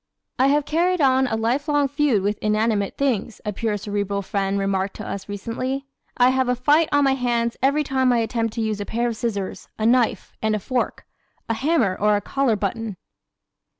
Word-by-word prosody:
"I 260 - +5
have 290 +1 +2
carried 350 +3 +1
on 265 -2 +4
a 225 - -1
life 240 +7 0
long 290 -1 +2
feud 280 -7 +1
with 205 +1 -1
inanimate 215 -1 0
things," 235 -6 -1
a 210 - -2
pure 210 +1 -1
Cerebral 200 -1 -2
friend 195 0 -1
remarked 195 0 -1
to - - -7
us 200 +1 -6
recently. 255 +7 -3 0.3
"I 245 0 +5
have 260 -1 +1
a 250 - +2
fight 295 +6 +3
on 290 -1 +4
my 270 -1 +4
hands 235 -2 0
every 280 +3 +3
time 260 -2 +1
I 240 - +3
attempt 230 -1 -1
to 230 - -1
use 215 -2 -1
a - - -3
pair 235 +1 0
of 230 - -4
scissors, 205 -4 -4
a 220 - -1
knife 240 0 +2
and 215 -1 +1
fork, 250 +4 -2 0.4
a 230 - 0
hammer 235 - +1
or 210 +1 +2
a 205 - 0
collar 270 -3 +1
button." 210 0 -3
230 Hz, 200 wpm, -22 LUFS, 210-265 Hz, 0.4 s, I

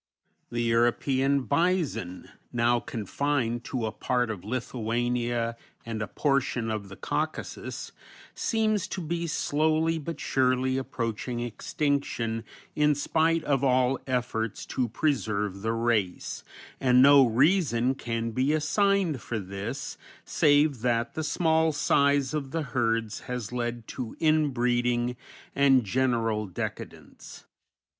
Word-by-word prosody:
The 120 0 -2
European 130 +4 +2
bison, 155 - 0 0.2
now 120 0 +2
confined 120 +2 -2
to 125 -4 -2
a 110 - -2
part 125 -1 -1
of 95 -5 -7
Lithuania 120 0 -1 0.3
and 115 -1 -4
a 105 - -2
portion 135 -5 0
of 105 -2 -4
the 95 - -9
Caucasus, - - -4 0.4
seems 215 -3 0
to - - -5
be 170 +1 -2
slowly 160 +1 +1
but 155 0 -6
surely 130 0 +1
approaching 120 -1 -3
extinction 120 -1 -2 0.3
in 150 0 +3
spite 160 +3 +1
of 140 -3 +1
all 130 0 +3
efforts 115 -4 -2
to 125 -3 0
preserve 110 -7 -1
the 110 +2 0
race, 115 -6 -1 0.4
and 125 -1 +5
no 140 0 +8
reason 130 - +3
can 115 -3 -3
be 130 +6 +1
assigned 175 - +1
for 115 - -4
this 100 0 -5 0.3
save 145 -4 +3
that 115 -1 0
the 160 - -3
small 160 +1 +2
size 140 -2 +2
of 145 -3 -2
the 160 +2 -2
herds 115 -4 -1
has 125 -4 -4
led 120 -2 -3
to 125 -4 -6
inbreeding 125 -6 +1 0.4
and 135 -3 +4
general 115 -1 0
decadence. 90 - -7
125 Hz, 120 wpm, -27 LUFS, 115-145 Hz, 0.4 s, no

